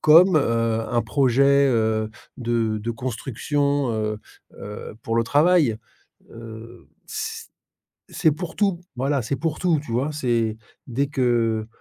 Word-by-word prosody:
comme, 165 +3 +7
heu, 115 -3 0
un 120 -2 +1
projet, 140 +3 +3
heu, 110 -2 +1 0.3
de 115 -3 0
de 115 +3 -3
construction, 135 +3 -1
heu 110 -1 -2 0.4
heu, 105 +2 -8
pour 115 - -1
le 115 - +4
travail, 145 -3 +3 0.5
heu, 115 +1 -11 0.2
c - - -5 0.7
c'est 160 - +3
pour 165 +3 -5
tout, 195 -4 +1 0.2
voilà, 135 +1 0
c'est 115 +5 -2
pour 155 +3 -2
tout, 170 -4 +2
tu 120 - -7
vois? 130 +6 0
C'est 115 -6 0 0.3
dès 130 +3 0
que 115 -5 +1
120 Hz, 135 wpm, -23 LUFS, 115-145 Hz, 0.7 s, comme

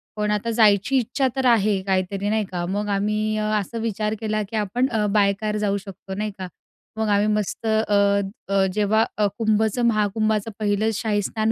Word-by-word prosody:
पण 210 0 -1
आता 210 +2 -1
जायची 220 +3 +3
इच्छा 260 +2 0
तर 265 -1 -1
आहे 210 -5 +3
काहीतरी 190 +1 0
नाही 215 -1 0
का. 175 -2 -4
मग 205 +3 -2
आम्ही 210 +2 0
अ, 215 - -1 0.2
असा 215 +4 -6
विचार 215 -1 -1
केला, 215 -1 -1
की 215 +3 -8
आपण 215 +5 0
अ, 220 -2 0
बाय 200 -1 +3
काऱ् 210 0 -1
जाऊ 200 -1 0
शकतो 195 -1 -9
नाही 210 +1 -3
का. 185 - -4 0.5
मग 220 0 0
आम्ही 205 +1 +3
मस्त 210 +1 -3
अ, 220 0 +2 0.7
अ, 195 -1 +3
जेव्हा 215 +1 +2
अ, 210 -1 +3
कुंभचं, 220 +1 +1
महाकुंभाचं 215 0 0
पहिलं 210 +1 +1
शाही 210 -1 0
स्नान 220 +2 -1
210 Hz, 190 wpm, -23 LUFS, 200-220 Hz, 0.7 s, जायची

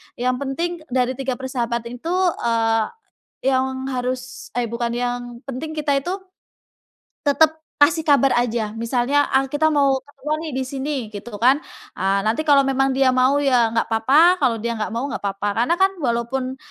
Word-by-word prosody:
Yang 250 +1 0
penting 330 +6 -1 0.2
dari 250 0 +1
3 270 -1 -2
persahabatan 240 -2 -3
itu, 335 +5 -3 0.3
eee, 225 -1 +2 0.6
yang 265 0 0
harus 250 -1 -4
eh 245 -1 0
bukan, 235 +1 -2
yang 245 +1 -1 0.3
penting 275 +4 -5
kita 290 -2 +1
itu 350 - -4 1.2
tetap 315 +3 +3 0.2
kasih 300 +3 +5
kabar 280 -3 +4
aja, 230 -3 0
misalnya, 245 +5 +1
"ah 265 0 +4
kita 295 +3 +2
mau 280 -2 +3 0.2
keluar 300 +3 -2
nih 320 -2 -5
disini," 265 -3 -3
gitu 205 +2 -7
kan, 255 +7 +4 0.4
eee, 195 +1 +1
nanti 220 +6 +1
kalau 280 -1 +6
memang 270 0 +1
dia 265 -1 +4
mau 255 +2 +3
ya 255 -5 +3
nggak 230 - 0
papa, 295 +11 +4
kalau 250 -5 +2
dia 235 - -1
nggak 215 - -2
mau 235 +3 -2
nggak - - -4
papa. 200 +1 -2 0.2
Karena 335 - +2
kan 385 +1 +3
walaupun 255 +1 -1
260 Hz, 165 wpm, -21 LUFS, 235-280 Hz, 1.2 s, kalau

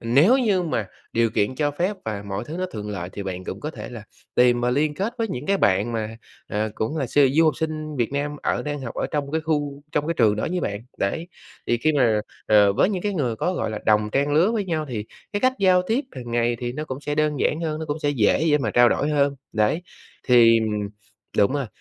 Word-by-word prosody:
nếu 145 - +4
như 205 -8 +2
mà 115 - -2 0.2
điều 115 0 +2
kiện 105 +3 0
cho 145 +2 0
phép 180 +7 -1
và 105 -2 -3
mọi 100 +2 -4
thứ 155 +7 -6
nó 185 - -1
thuận 105 0 -5
lợi 90 -4 -4
thì 100 - -5
bạn 95 -1 -5
cũng - - -6
có 150 - -4
thể - - -8
là 120 -3 -8 0.3
tìm 120 -1 +4
mà 125 - +2
liên 150 +4 +1
kết 200 +8 -2
với 225 -1 0
những 145 -6 -5
cái 200 - +3
bạn 105 - +2
mà, 110 0 -3 0.3
à, 105 +1 -1
cũng 130 +9 -2
là 135 - -1
su 145 +4 +3
du 160 +3 +4
học 155 - +2
sinh 155 -2 -3
Việt 120 +2 -1
Nam 145 +1 -2
ở - - 0
đang 145 -1 -4
học 125 -3 -6
ở - - -1
trong 145 -2 -2
cái 160 - +1
khu 145 -2 -2
trong 150 0 0
cái 170 - 0
trường 110 -7 +3
đó - - -1
với 180 0 -1
bạn, 100 -7 -3 0.2
đấy. 160 - -2 0.4
Thì 120 - +2
khi 155 +6 +2
mà, 120 -7 +3 0.3
ờ, 105 -2 +5
với 195 - +3
những 185 -4 -2
cái 205 -1 -1
người 125 -9 -1
có, 180 - -1
gọi 140 - -2
là, 110 - -4
đồng 105 0 +3
trang 140 +3 +1
lứa 165 +8 +4
với 215 -3 0
nhau 160 -4 -2
thì 110 -5 -4 0.3
cái 205 - -1
cách 255 +2 +3
giao 185 -2 +4
tiếp 245 +6 0
hàng 120 -2 -8
ngày 120 0 +1
thì 120 0 -3
nó 150 +3 -4
cũng 135 -2 -6
sẽ 145 0 -3
đơn 150 -1 0
giản 155 - +1
hơn, 155 -2 -2
nó 160 - -4
cũng 145 +2 -2
sẽ 145 -2 0
dễ 120 +1 +2
dễ 150 -2 +4
mà 115 -6 -1
trao 120 +3 +6
đổi 145 - 0
hơn, 140 -1 +2 0.2
đấy. 110 +10 +1 0.5
Thì 115 -2 +6 0.8
đúng 100 +4 +4
rồi, 140 -3 -1
140 Hz, 260 wpm, -23 LUFS, 115-160 Hz, 0.8 s, trao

